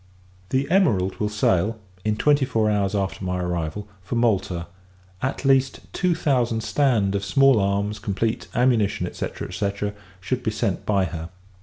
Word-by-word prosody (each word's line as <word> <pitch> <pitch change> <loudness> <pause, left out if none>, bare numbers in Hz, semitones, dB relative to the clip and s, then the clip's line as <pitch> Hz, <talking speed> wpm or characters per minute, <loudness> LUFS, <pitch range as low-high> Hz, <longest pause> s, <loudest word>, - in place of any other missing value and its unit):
The 135 +1 +1
Emerald 100 - +2
will 105 - -1
sail 105 +1 +1 0.2
in 110 0 +1
twenty 145 +4 +3
four 110 -5 +1
hours 100 -1 0
after 95 -1 -2
my 90 0 -1
arrival 90 +2 -3
for 100 +6 -5
Malta; 95 -7 +1 0.6
at 135 +2 -2
least, 135 -1 +3
two 180 -2 +1
thousand 125 -8 +1
stand 115 -10 +2
of 100 0 -1
small 135 +4 +4
arms 100 +2 0
complete, 110 +2 -2
ammunition, 120 -4 +2
&c. - - -3 0.2
&c. 100 +2 -2 0.3
should 125 +7 -2
be 115 - -1
sent 105 -3 -2
by 100 -3 +2
her. 80 -1 -6
105 Hz, 155 wpm, -23 LUFS, 95-125 Hz, 0.6 s, small